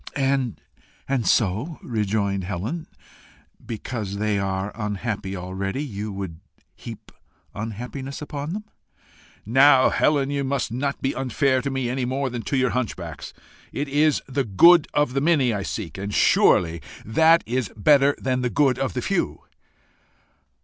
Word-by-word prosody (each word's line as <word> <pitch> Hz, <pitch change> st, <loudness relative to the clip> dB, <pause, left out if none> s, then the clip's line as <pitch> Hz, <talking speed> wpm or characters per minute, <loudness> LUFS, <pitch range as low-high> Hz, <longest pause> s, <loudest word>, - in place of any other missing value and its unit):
"And 135 Hz, -4 st, 0 dB, 0.7 s
so," 110 Hz, -, +1 dB
rejoined 100 Hz, -4 st, -1 dB
Helen, 105 Hz, -, -4 dB, 0.8 s
"because 110 Hz, -3 st, -5 dB
they 105 Hz, -1 st, 0 dB
are 95 Hz, +1 st, -2 dB
unhappy 105 Hz, -2 st, -3 dB
already, 95 Hz, +7 st, -3 dB
you 105 Hz, -6 st, -5 dB
would 95 Hz, -5 st, -6 dB, 0.4 s
heap -, -, -10 dB, 0.4 s
unhappiness 125 Hz, +6 st, -6 dB
upon 150 Hz, +1 st, -5 dB
them?" 210 Hz, +1 st, -4 dB, 0.8 s
"Now, 130 Hz, +4 st, +6 dB
Helen, 140 Hz, -2 st, +2 dB
you 140 Hz, -1 st, -1 dB
must 135 Hz, -4 st, -1 dB
not 140 Hz, +4 st, -3 dB
be 135 Hz, -, +1 dB
unfair 130 Hz, 0 st, +1 dB
to 140 Hz, -, -2 dB
me 135 Hz, -2 st, -2 dB
any 125 Hz, +1 st, -1 dB
more 130 Hz, +1 st, -2 dB
than 120 Hz, -1 st, -4 dB
to 140 Hz, -, +1 dB
your 130 Hz, -1 st, +2 dB
hunchbacks. 90 Hz, -, -4 dB, 0.4 s
It 145 Hz, -, -3 dB
is 150 Hz, +2 st, +2 dB
the 135 Hz, +1 st, -1 dB
good 155 Hz, -, +6 dB
of 145 Hz, -4 st, +1 dB
the 135 Hz, -, 0 dB
many 145 Hz, -6 st, +3 dB
I 100 Hz, -, -2 dB
seek, 95 Hz, -4 st, -5 dB
and 100 Hz, +1 st, -4 dB
surely 85 Hz, -4 st, +3 dB, 0.2 s
that 160 Hz, +9 st, +4 dB
is 125 Hz, -1 st, -1 dB
better 140 Hz, +5 st, +4 dB
than 130 Hz, -1 st, -1 dB
the 125 Hz, -, 0 dB
good 135 Hz, -2 st, +2 dB
of 135 Hz, -8 st, -1 dB
the -, -, -2 dB
few." -, -, -1 dB
125 Hz, 145 wpm, -23 LUFS, 100-140 Hz, 0.8 s, Now